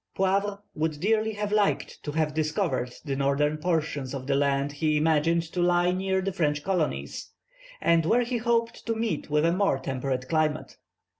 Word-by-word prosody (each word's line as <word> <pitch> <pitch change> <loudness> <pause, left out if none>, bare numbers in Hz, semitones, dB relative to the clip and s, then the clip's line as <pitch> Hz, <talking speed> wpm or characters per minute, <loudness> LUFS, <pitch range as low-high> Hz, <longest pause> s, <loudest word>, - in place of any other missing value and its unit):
Poivre 200 +1 +1
would 155 -1 -2
dearly 220 +3 +1
have 205 0 -3
liked 210 -1 0
to 145 - -5
have 155 -1 0
discovered 150 -5 -1
the 140 -2 -2
northern 140 +2 +1
portion 155 -4 -1
of 130 -1 -6
the 140 - 0
lands 140 0 +1
he 155 +1 +1
imagined 160 +2 +2
to 180 - 0
lie 175 0 +3
near 190 +1 0
the 195 0 -2
French 150 -5 0
colonies, 180 -5 -2 0.5
and 165 -1 +3
where 235 +5 +4
he 240 +1 -2
hoped 230 0 0
to 230 - 0
meet 220 -11 -2
with 150 +1 +2
a 170 - +3
more 185 -5 +2
temperate 130 -1 -3
climate. 155 -1 -1
160 Hz, 175 wpm, -27 LUFS, 145-195 Hz, 0.5 s, where